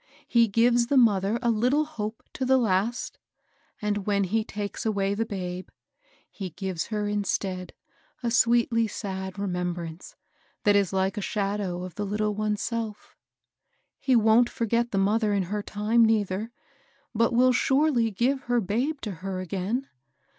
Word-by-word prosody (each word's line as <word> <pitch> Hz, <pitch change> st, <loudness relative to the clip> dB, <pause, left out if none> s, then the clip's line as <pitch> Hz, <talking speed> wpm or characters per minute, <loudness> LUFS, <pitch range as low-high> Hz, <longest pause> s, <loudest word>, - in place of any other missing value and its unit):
He 235 Hz, -1 st, +4 dB
gives 235 Hz, +3 st, +3 dB
the 280 Hz, -, +2 dB
mother 210 Hz, -3 st, +4 dB
a 235 Hz, -, +3 dB
little 250 Hz, +7 st, +2 dB
hope 220 Hz, -7 st, -6 dB
to 260 Hz, -, -3 dB
the 260 Hz, +1 st, +4 dB
last; 225 Hz, +1 st, 0 dB, 0.6 s
and, 205 Hz, -1 st, -2 dB
when 200 Hz, -1 st, +2 dB
he 215 Hz, +4 st, 0 dB
takes 205 Hz, -1 st, -5 dB
away 200 Hz, -3 st, 0 dB
the 225 Hz, +2 st, -1 dB
babe, 185 Hz, -2 st, -5 dB, 0.6 s
he 190 Hz, -3 st, -6 dB
gives 180 Hz, 0 st, -4 dB
her 210 Hz, -2 st, -2 dB
instead 195 Hz, -3 st, -2 dB, 0.5 s
a 235 Hz, -, 0 dB
sweetly 235 Hz, -1 st, +3 dB
sad 190 Hz, -2 st, -5 dB
re 200 Hz, -, -2 dB
membrance 175 Hz, -2 st, -4 dB, 0.5 s
that 205 Hz, -3 st, +4 dB
is 200 Hz, -3 st, +2 dB
like 190 Hz, 0 st, 0 dB
a -, -, -1 dB
shadow 195 Hz, -3 st, -2 dB
of 185 Hz, -1 st, -7 dB
the 205 Hz, -, -3 dB
little 210 Hz, +1 st, 0 dB
one's 210 Hz, 0 st, -1 dB
self. 225 Hz, -3 st, -4 dB, 0.8 s
He 265 Hz, -2 st, +2 dB
wont 225 Hz, +2 st, +5 dB
forget 235 Hz, +1 st, 0 dB
the 200 Hz, -, -2 dB
mother 210 Hz, +2 st, +2 dB
in 200 Hz, -1 st, +1 dB
her 210 Hz, -, -1 dB
time, 215 Hz, +3 st, +2 dB
nei 220 Hz, -2 st, +4 dB
ther; 195 Hz, +4 st, -4 dB, 0.6 s
but 230 Hz, +2 st, +2 dB
will 250 Hz, +2 st, +4 dB
surely 265 Hz, -2 st, +2 dB
give 250 Hz, +6 st, 0 dB
her 245 Hz, 0 st, +2 dB
babe 245 Hz, +9 st, -1 dB
to 215 Hz, -, -4 dB
her 190 Hz, -1 st, -3 dB
again. 195 Hz, +8 st, -2 dB
210 Hz, 160 wpm, -26 LUFS, 195-235 Hz, 0.8 s, wont